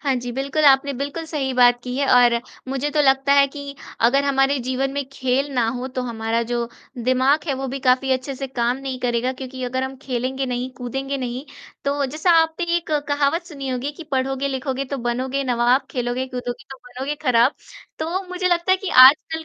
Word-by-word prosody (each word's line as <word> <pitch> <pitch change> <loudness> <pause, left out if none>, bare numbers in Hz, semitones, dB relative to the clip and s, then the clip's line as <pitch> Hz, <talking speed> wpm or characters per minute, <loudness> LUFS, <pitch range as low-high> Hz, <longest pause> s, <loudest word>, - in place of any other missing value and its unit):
हाँ 275 -2 0
जी। 245 0 -4
बिल्कुल, 275 +4 -1
आपने 275 0 +5
बिल्कुल 280 +5 -4
सही 285 -4 -2
बात 245 -1 +5
की 250 0 -5
है 280 0 +1
और 245 -1 +6 0.3
मुझे 270 +2 -1
तो 300 - +1
लगता 270 0 +3
है 280 0 +6
कि 280 0 -8 0.3
अगर 270 +5 +4
हमारे 275 0 +2
जीवन 260 +2 -1
में 280 0 -2
खेल 270 +2 -1
ना 240 -3 +2
हो, 250 +2 -3
तो 255 -1 -4
हमारा 230 -1 -2
जो 235 0 -2 0.4
दिमाग 260 +4 +2
है, 280 - 0
वो 270 +1 -4
भी 270 +2 -4
काफ़ी 260 +1 +2
अच्छे 260 +1 -2
से 270 +1 -5
काम 245 -1 -1
नहीं 270 -1 -5
करेगा 245 +1 0
क्योंकि 260 0 -8
अगर 260 +1 -2
हम 265 0 -4
खेलेंगे 260 +1 -2
नहीं, 250 0 -3
कूदेंगे 270 +3 -4
नहीं 255 +1 -4 0.4
तो 280 0 0
जैसा 310 +6 0
आपने 325 +2 -1
एक 340 -2 -5 0.2
कहावत 290 +4 +1
सुनी 275 -5 -7
होगी 255 +2 -2
कि, 335 - -10
पढ़ोगे 270 -1 -1
लिखोगे 270 0 -3
तो 280 +1 -4
बनोगे 255 +3 -2
नवाब, 245 +1 +2
खेलोगे 245 0 -2
कूदोगे 245 -1 -6
तो 270 - -8
बनोगे 265 +4 -4
खराब, 250 0 +4 0.5
तो 340 +5 -2
मुझे 365 0 -2
लगता 350 +1 +1
है - - +4
कि 380 0 -6
आजकल, 285 +5 +6
265 Hz, 205 wpm, -21 LUFS, 250-280 Hz, 0.5 s, और